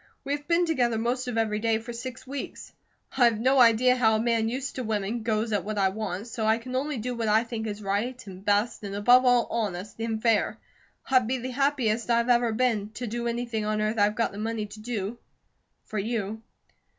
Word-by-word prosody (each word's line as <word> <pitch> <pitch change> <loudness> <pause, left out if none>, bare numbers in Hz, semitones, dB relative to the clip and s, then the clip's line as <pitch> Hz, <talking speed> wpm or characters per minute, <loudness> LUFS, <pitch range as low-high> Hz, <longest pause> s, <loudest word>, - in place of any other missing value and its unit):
We 280 - -4
have 290 0 -5
been 345 +1 +3
together 245 -8 +1
most 245 +3 -1
of 245 -2 -3
every 215 -2 +1
day 225 0 +1
for 235 +2 -7
six 245 +1 -7
weeks. 275 +1 -7 0.4
I 255 -2 +5
have 230 -2 +3
no 260 +3 +3
idea 245 +2 +5
how 220 -3 +3
a - - +1
man 230 -1 +1
used 260 +3 -3
to 255 - -2
women 215 +1 -2
goes 220 0 -1
at 205 - +1
what 215 +1 -4
I 195 -1 +3
want, 205 -1 -4
so 230 -1 -5
I 220 +1 +3
can 255 +2 -7
only 280 +2 -1
do 250 +3 -3
what 230 -1 -2
I 215 +2 +4
think 225 -2 -5
is 210 0 -5
right, 210 +6 -1
and 190 -1 -10
best, 205 +3 +1
and 200 -1 -5
above 245 +5 +5
all 245 -1 +4
honest, 210 -2 -3
and 225 -1 -2
fair. 225 -1 +2 0.5
I'd 255 -4 +4
be 260 +2 0
the 255 +1 -5
happiest 250 -5 0
I've 235 +1 +2
ever 240 -1 +4
been, 220 -3 0
to 245 - -5
do 235 +1 -3
anything 235 -2 -2
on 215 0 -1
earth 215 +1 0
I've 205 +1 +3
got 230 - 0
the 200 - -8
money 220 0 -2
to 210 +1 -11
do, 220 0 -4 0.6
for 215 - -4
you. 220 0 -3
230 Hz, 225 wpm, -27 LUFS, 215-245 Hz, 0.6 s, I